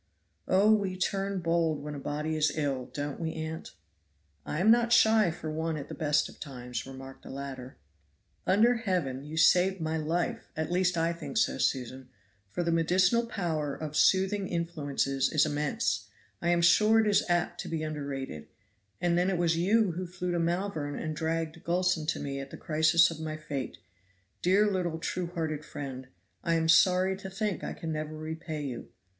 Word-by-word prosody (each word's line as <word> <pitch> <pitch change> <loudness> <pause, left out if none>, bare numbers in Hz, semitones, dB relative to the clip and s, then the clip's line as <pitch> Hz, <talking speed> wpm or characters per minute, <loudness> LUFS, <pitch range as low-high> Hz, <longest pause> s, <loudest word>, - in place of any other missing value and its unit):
"Oh! 200 +4 +5
we 195 -3 0
turn 195 +1 -1
bold 165 -3 +1
when 150 0 -5
a 145 - -6
body 150 +3 -2
is 155 -1 +2
ill, 140 -4 -1
don't 145 -1 -5
we, 160 -1 -3
aunt?" 160 +1 -5 0.7
"I 150 - -2
am 210 +5 +5
not 235 0 +4
shy 220 -4 +5
for 160 -1 -5
one 160 0 -2
at 140 - -7
the - - -6
best 150 -2 +1
of - - -15
times," 125 -2 -6
remarked 135 0 -10
the - - -12
latter. 135 -2 -7 0.7
"Under 230 +6 +4
Heaven 175 - -1
you 150 +2 -7
saved 180 +4 +4
my 160 0 -1
life, 160 +3 -2
at 160 +1 -2
least 180 0 +2
I 165 +1 +1
think 170 +7 -6
so, 220 - +2
Susan, 130 0 -1 0.4
for 140 - -2
the 170 - 0
medicinal 185 +8 +3
power 160 -9 -2
of 155 -1 -6
soothing 190 +3 +3
influences 145 -6 -1
is 155 -1 +4
immense, 145 -9 -1 0.3
I 170 - 0
am 170 0 +3
sure 215 +6 +6
it 220 - +3
is 205 -1 +3
apt 175 0 0
to - - -7
be 160 -1 -2
underrated; 140 - -5 0.5
and 175 0 +2
then 180 +2 +2
it 190 - 0
was 170 -1 +2
you 200 +4 +3
who 180 +2 -4
flew 180 0 -4
to 175 - 0
Malvern 170 -4 -1
and 155 -1 -3
dragged 160 0 -2
Gulson 175 -2 +1
to - - 0
me 140 -1 -4
at 135 0 -7
the - - -9
crisis 160 +2 +4
of 160 - -7
my 155 -1 -4
fate; 140 -4 -5 0.6
dear 195 +4 +4
little 180 -5 -1
true 175 +2 -3
hearted 160 -3 -3
friend, 130 -4 -7 0.4
I 170 -1 +1
am 160 0 +1
sorry 185 +3 +5
to 190 0 -7
think 200 0 -2
I - - -3
can 165 - -5
never 155 0 -4
repay 160 0 -5
you." 125 -4 -6
165 Hz, 185 wpm, -29 LUFS, 150-180 Hz, 0.7 s, sure